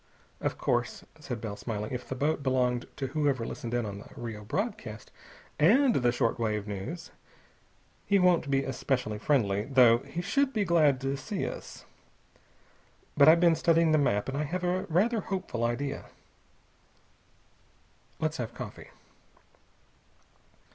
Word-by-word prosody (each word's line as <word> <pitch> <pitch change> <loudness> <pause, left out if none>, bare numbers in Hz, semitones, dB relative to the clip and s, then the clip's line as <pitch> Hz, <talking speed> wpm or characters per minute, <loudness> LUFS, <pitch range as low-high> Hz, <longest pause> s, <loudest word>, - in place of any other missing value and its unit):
"Of - - -2
course," 120 0 -1 0.2
said 125 -6 -5
Bell, 105 -3 -4
smiling, 105 0 -4
"if 125 -1 -5
the 130 - -3
boat 145 +3 0
belonged 125 -2 0
to 135 -2 -4
whoever 140 -5 0
listened 120 +1 -5
in 120 -2 0
on 100 -1 -6
the - - -12
Rio 110 -3 -6
broadcast 115 - -4 0.5
and 240 - +5
the 120 -2 +2
short 120 -1 0
wave 105 -2 -1
news, 105 - -6 1.0
he 200 - +4
won't 180 -5 +3
be 135 0 +2
especially 125 -4 -2
friendly, 105 -6 +1
though 125 -3 +5
he 140 +6 -6
should 275 +7 +1
be 210 -3 +1
glad 155 -6 +3
to 135 +1 -1
see 200 +7 -3
us. - - -8 1.3
But 140 - +6
I've 165 +1 +7
been 170 -1 +5
studying 165 0 +3
the 155 - +4
map, 105 -8 +1
and 135 - -3
I 150 +2 -1
have 180 +5 -3
a 180 +1 0
rather 215 +8 +2
hopeful 185 - -3
idea. 135 +4 -2 2.1
Let's 155 0 -1
have 120 -1 -5
coffee." - - -8
135 Hz, 145 wpm, -29 LUFS, 120-165 Hz, 2.1 s, I've